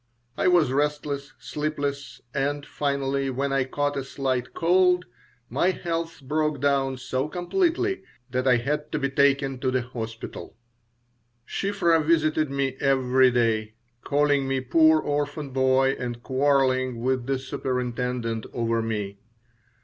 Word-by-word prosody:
I -, -, +1 dB
was 175 Hz, -7 st, +4 dB
restless, 145 Hz, 0 st, -1 dB
sleepless, 145 Hz, -2 st, -4 dB
and 145 Hz, +1 st, -1 dB
finally, 140 Hz, -1 st, -1 dB
when 135 Hz, +2 st, -1 dB
I 135 Hz, -1 st, +2 dB
caught 145 Hz, +2 st, -1 dB
a 135 Hz, -, -2 dB
slight 130 Hz, -2 st, -2 dB
cold, 180 Hz, +1 st, +3 dB, 0.4 s
my 140 Hz, +10 st, +1 dB
health 165 Hz, -4 st, -3 dB
broke 150 Hz, +1 st, 0 dB
down 135 Hz, -1 st, +1 dB
so 130 Hz, +2 st, -2 dB
completely 355 Hz, -, 0 dB, 0.3 s
that 130 Hz, +1 st, 0 dB
I 125 Hz, -1 st, +5 dB
had 150 Hz, +5 st, -2 dB
to -, -, +1 dB
be 135 Hz, -2 st, -1 dB
taken 135 Hz, -1 st, +2 dB
to 130 Hz, 0 st, 0 dB
the 130 Hz, -1 st, 0 dB
hospital. 115 Hz, -2 st, -7 dB, 0.9 s
Shiphrah 175 Hz, -5 st, +1 dB
visited 155 Hz, -1 st, +2 dB
me 135 Hz, -1 st, -1 dB
every 130 Hz, -1 st, +4 dB
day, 110 Hz, -3 st, 0 dB, 0.3 s
calling 145 Hz, -1 st, +2 dB
me 135 Hz, 0 st, 0 dB
poor 155 Hz, +5 st, +4 dB
orphan 145 Hz, -1 st, -2 dB
boy 130 Hz, 0 st, +3 dB
and 120 Hz, -1 st, -5 dB
quarreling 130 Hz, -3 st, +1 dB
with 130 Hz, 0 st, 0 dB
the 135 Hz, -1 st, +1 dB
superintendent 125 Hz, -3 st, -3 dB
over 115 Hz, -1 st, 0 dB
me. 105 Hz, -3 st, -3 dB
135 Hz, 135 wpm, -25 LUFS, 130-150 Hz, 0.9 s, I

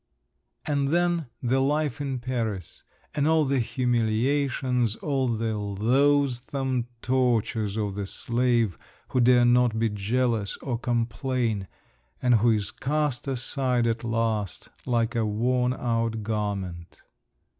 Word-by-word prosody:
And 140 Hz, -2 st, 0 dB
then, 170 Hz, 0 st, +1 dB, 0.2 s
the 130 Hz, +2 st, +2 dB
life 145 Hz, 0 st, 0 dB
in 135 Hz, -2 st, -2 dB
Paris, 115 Hz, -8 st, -3 dB, 0.3 s
and 145 Hz, 0 st, +1 dB
all 160 Hz, -1 st, +4 dB
the 135 Hz, -1 st, +1 dB
humiliations, 125 Hz, +1 st, +1 dB
all 135 Hz, -2 st, -1 dB
the 115 Hz, -1 st, -1 dB
loathsome 130 Hz, +4 st, +1 dB, 0.2 s
tortures 115 Hz, -4 st, +1 dB
of 105 Hz, -2 st, -1 dB
the 100 Hz, 0 st, -4 dB
slave, 120 Hz, -4 st, 0 dB, 0.3 s
who 130 Hz, -, 0 dB
dare 120 Hz, 0 st, +5 dB
not 120 Hz, -2 st, +3 dB
be 115 Hz, 0 st, +2 dB
jealous 110 Hz, +1 st, -1 dB
or 120 Hz, -4 st, -3 dB
complain, 120 Hz, -3 st, -1 dB, 0.5 s
and 125 Hz, -1 st, +3 dB
who 120 Hz, -, +4 dB
is 105 Hz, -3 st, +1 dB
cast 145 Hz, -2 st, -1 dB
aside 130 Hz, -1 st, 0 dB
at 115 Hz, 0 st, -1 dB
last, 115 Hz, -4 st, -1 dB, 0.2 s
like 120 Hz, -2 st, +1 dB
a 115 Hz, -, +2 dB
worn 125 Hz, +4 st, +1 dB
out 115 Hz, -3 st, -1 dB
garment…. 100 Hz, -5 st, -4 dB
120 Hz, 125 wpm, -26 LUFS, 110-130 Hz, 0.5 s, dare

